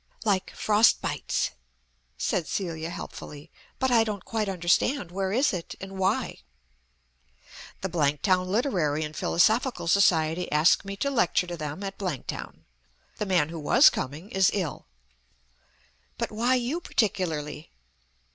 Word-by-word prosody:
"Like 195 -3 +1
'Frostbites,'" 215 +1 +2 0.7
said 165 -4 -1
Celia 165 -2 -3
helpfully. 150 -2 -9 0.3
"But 260 -1 0
I 230 -2 +5
don't 210 -4 -5
quite 220 -3 -2
understand. 180 +4 +1
Where 190 +1 -2
is 255 +5 +2
it, 175 -3 -5
and 195 0 -8
why?" 190 0 0 1.4
"The 190 - -2
Blanktown 175 +4 +1
Literary 185 - 0
and 155 0 -6
Philosophical 220 +3 +2
Society 170 -2 +3
ask 150 +3 +4
me 195 0 -5
to 280 +7 -1
lecture 225 -7 +2
to 175 -1 -5
them 155 +3 -5
at 195 0 -6
Blanktown. 180 -10 -5 0.5
The 210 - -3
man 175 -5 +2
who 165 0 -6
was 150 - +6
coming 155 +10 -5
is 190 -1 +4
ill." 170 - -3 1.3
"But - - -2
why 235 +4 +2
you 255 +8 -1
particularly?" 160 - -2
185 Hz, 130 wpm, -27 LUFS, 160-210 Hz, 1.4 s, was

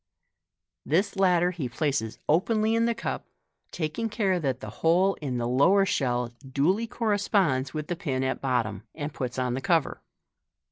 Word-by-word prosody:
This 185 +9 +1
latter 180 -2 +3
he 155 -8 -4
places 135 -4 -1
openly 215 +7 +2
in 230 0 +3
the 235 0 +1
cup, - - -4 0.4
taking 170 +8 -3
care 200 -4 +1
that 135 -5 -1
the - - -7
hole 180 +4 +4
in 130 -4 -2
the 120 0 -1
lower 185 +11 +4
shell 125 -7 0
duly 150 - 0
corresponds 200 - +1
with 155 -1 -3
the 175 - -3
pin 135 -7 -2
at 130 0 -2
bottom, 115 -7 -1
and 145 -1 -5
puts 125 -1 -4
on 125 -1 0
the 130 - -3
cover. 165 -1 +1
155 Hz, 160 wpm, -27 LUFS, 130-195 Hz, 0.4 s, hole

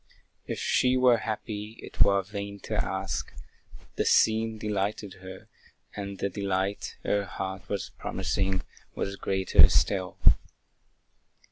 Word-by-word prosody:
If - - -3
she 130 0 +2
were 125 -2 +5
happy, 110 0 -5
it - - -6
were 100 -1 +5
vain 100 0 -6
to - - -6
ask; - - -2 0.7
The - - +2
scene 110 0 +3
delighted 105 -1 -2
her, 95 0 -10 0.5
and 100 -1 -5
the 100 - -1
delight 100 0 -2
Her 100 0 +1
heart 95 -1 -6
was 100 -2 -3
promising, 95 -1 -1 0.3
was 100 - -2
greater 95 -1 +5
still. 95 -3 +1
100 Hz, 120 wpm, -28 LUFS, 95-105 Hz, 0.7 s, were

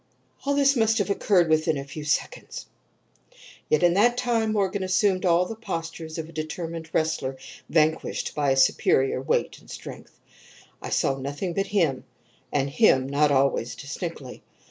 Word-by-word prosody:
"All 280 0 +1
this 280 0 +4
must 225 -2 +2
have 205 -1 0
occurred 190 -3 +3
within 155 -1 +2
a 140 - -4
few 145 +2 -8
seconds, 155 - -3 1.0
yet 155 - +2
in 175 -1 +5
that 240 +6 +3
time 235 -3 +1
Morgan 200 -1 0
assumed 185 0 +1
all 175 +1 +4
the 225 - -6
postures 165 -6 -6
of 160 -1 -4
a - - -13
determined 160 +1 -5
wrestler 145 -4 -1 0.3
vanquished 160 0 0
by 140 -2 +1
superior 135 0 +2
weight 135 - -1
and - - -20
strength. - - -10 0.6
I - - -6
saw 135 - +1
nothing 145 +7 -4
but 195 +2 -1
him, 165 -11 +1 0.5
and 140 -1 0
him 135 - +4
not 145 +2 +2
always 135 -3 +1
distinctly. 150 -2 -7
165 Hz, 155 wpm, -25 LUFS, 145-200 Hz, 1.0 s, in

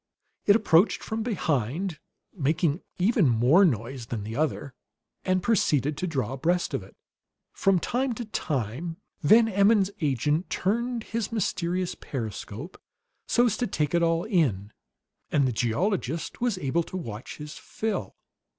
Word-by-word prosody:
It 200 - +7
approached 200 -3 +3
from 220 0 -3
behind, 160 - -1 0.3
making 155 0 0 0.2
even 190 - +3
more 125 - +5
noise 125 - 0
than 110 -4 -4
the 110 +2 -5
other, 145 -2 -1 0.5
and 185 -1 +1
proceeded 150 - +2
to 185 - -2
draw 130 -7 -2
abreast 175 +7 0
of - - -1
it. - - -15 0.6
From 195 -2 +3
time 245 +8 0
to 235 +1 -5
time 150 - -3 0.2
Van 220 +9 +6
Emmon's 200 -1 +3
agent 150 - 0
turned 235 +4 -1
his 225 -2 -3
mysterious 180 -4 -1
periscope 120 - -6 0.5
so 240 - +4
as 230 - +2
to 245 - 0
take 150 -4 -1
it 170 - +3
all 165 0 +2
in, 130 - 0 0.6
and 140 -3 +3
the - - 0
geologist 155 - -1
was 240 -5 +1
able 155 +1 0
to 185 - -6
watch 115 - -7
his 150 +1 -8
fill. 220 -2 -3
170 Hz, 145 wpm, -27 LUFS, 135-200 Hz, 0.6 s, It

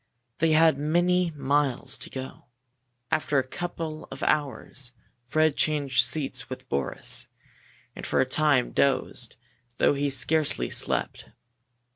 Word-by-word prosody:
They 160 -1 +3
had 160 -2 +5
many 175 +4 +2
miles 140 -2 0
to - - -6
go. 130 0 -8 0.7
After 150 -2 +1
a 130 -1 +1
couple 165 0 -5
of 135 - -7
hours 135 -3 -1 0.3
Fred 155 +2 +2
changed 140 -6 +2
seats 135 +3 -1
with - - -8
Boris, 70 -1 -2 0.7
and - - -8
for - - 0
a 130 - +4
time 140 -1 +2
dozed, 140 -1 0 0.4
though - - +4
he 145 0 0
scarcely 140 - 0
slept. - - -1
145 Hz, 125 wpm, -26 LUFS, 130-155 Hz, 0.7 s, had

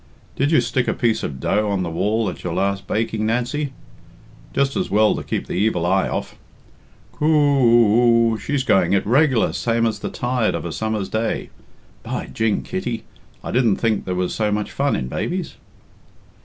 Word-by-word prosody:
Did 140 +2 +1
you 155 - +5
stick 130 -3 -1
a - - 0
piece 115 -2 +1
of 65 -2 -5
dough 105 +9 0
on 100 -2 0
the 85 - -3
wall 105 +6 0
at 90 - -6
your 85 -2 -3
last 100 0 -1
baking, 110 0 -1
Nancy? 125 +5 -1 0.8
Just 140 0 0
as 185 - -1
well 105 +1 +4
to - - -4
keep - - -3
the - - -6
evil 90 -2 +1
eye 95 +2 +2
off. - - -4 0.8
Coo 150 - -2
oo 120 -6 +4
oo! - - -2
She's 140 -2 -1
going 95 -6 +3
it 100 - +2
reg'lar, 130 +1 +3
same 115 0 0
as 110 -3 -1
the - - -4
tide 120 -2 -1
of - - -4
a - - -4
summer's 110 -3 -2
day. 110 +1 -2 0.5
By - - -4
jing, 110 -2 -1
Kitty, 120 -12 -4 0.4
I - - -5
didn't 120 -5 +3
think 110 -3 0
there 90 - -2
was 90 0 -1
so 105 -2 0
much 105 0 -2
fun 140 0 0
in 65 - -3
babies." 175 - -3
115 Hz, 190 wpm, -21 LUFS, 105-130 Hz, 0.8 s, you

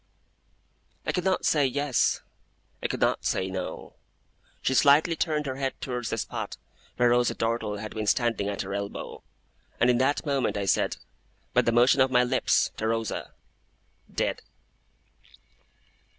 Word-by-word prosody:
I - - +1
could 180 - -1
not 190 -1 +1
say 150 -2 +3
Yes, 135 -1 +1 0.6
I - - 0
could - - -4
not - - +2
say 95 0 -1
No. 95 -1 -5 0.7
She 130 - +1
slightly 150 +5 +5
turned 155 -3 -1
her 130 -1 -4
head 135 -1 -3
towards 125 -3 -3
the 115 - -2
spot - - -4 0.4
where 120 0 +4
Rosa 120 0 +2
Dartle 115 -2 -1
had 110 +1 -6
been 110 -1 -3
standing 115 -3 +1
at 100 -1 -3
her 95 0 -6
elbow, 100 0 -5 0.6
and 125 - +5
in 120 - +1
that 140 +4 +1
moment 140 -7 0
I 100 - -1
said, 95 - +1 0.6
by - - +5
the 115 - +1
motion 125 +3 +5
of 130 - +4
my 125 -1 +4
lips, 125 - +2
to 110 - -1
Rosa, 115 -1 -2 0.8
'Dead! - - -1
120 Hz, 155 wpm, -27 LUFS, 110-140 Hz, 0.8 s, slightly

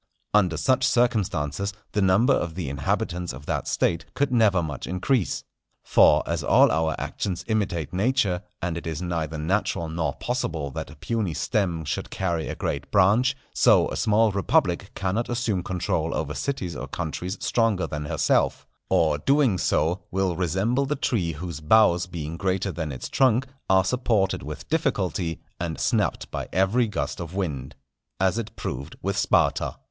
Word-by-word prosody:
Under 90 -6 +3
such 130 - +2
circumstances 100 - 0 0.2
the 105 - 0
number 100 +8 +4
of 85 -8 -1
the 85 -7 -3
inhabitants 85 +5 -2
of 70 +3 -10
that - - -2
State 85 -1 0
could 140 -1 +1
never 105 -7 +4
much 75 -4 -5
increase. 95 +5 0 0.4
For - - +5
as - - -2
all - - +5
our 80 +1 +1
actions 95 -4 -3
imitate 95 - -1
nature, 100 -2 +1 0.2
and 85 -2 -1
it 85 - -6
is 80 +1 -3
neither 80 -3 -2
natural 85 0 -1
nor 80 -1 -1
possible 80 - -3
that - - -5
a - - -12
puny 110 -9 -2
stem 90 -8 -1
should 75 - -3
carry 85 -4 -2
a - - -4
great 70 - -3
branch, 120 +9 +4 0.2
so - - +5
a - - -4
small 110 0 +3
republic 95 -1 +1
cannot 100 +5 -1
assume 115 -6 0
control 85 -3 -1
over 75 -1 -2
cities 90 - -3
or 65 +2 -5
countries 90 +6 -4
stronger 115 -5 +1
than 75 -1 -4
herself; - - +1 0.2
or, 75 -3 +3
doing 135 - +3
so, 85 +6 +1
will 95 -1 0
resemble 95 - 0
the 150 - 0
tree 95 - 0
whose 85 0 -6
boughs 90 +1 +4
being 85 -2 -5
greater 95 +1 0
than 80 -4 -4
its 65 - -6
trunk, 130 0 +3 0.2
are 95 -1 +4
supported 110 -4 +1
with 75 +2 -7
difficulty, 95 - -1 0.2
and 85 -2 -3
snapped - - 0
by - - -4
every 105 +6 +2
gust 105 - -3
of 85 +1 -6
wind. 70 -8 -3 0.4
As 95 +4 +2
it 110 -1 -6
proved 70 +5 -5
with 100 0 -1
Sparta. 100 - +2
90 Hz, 165 wpm, -25 LUFS, 80-110 Hz, 0.4 s, For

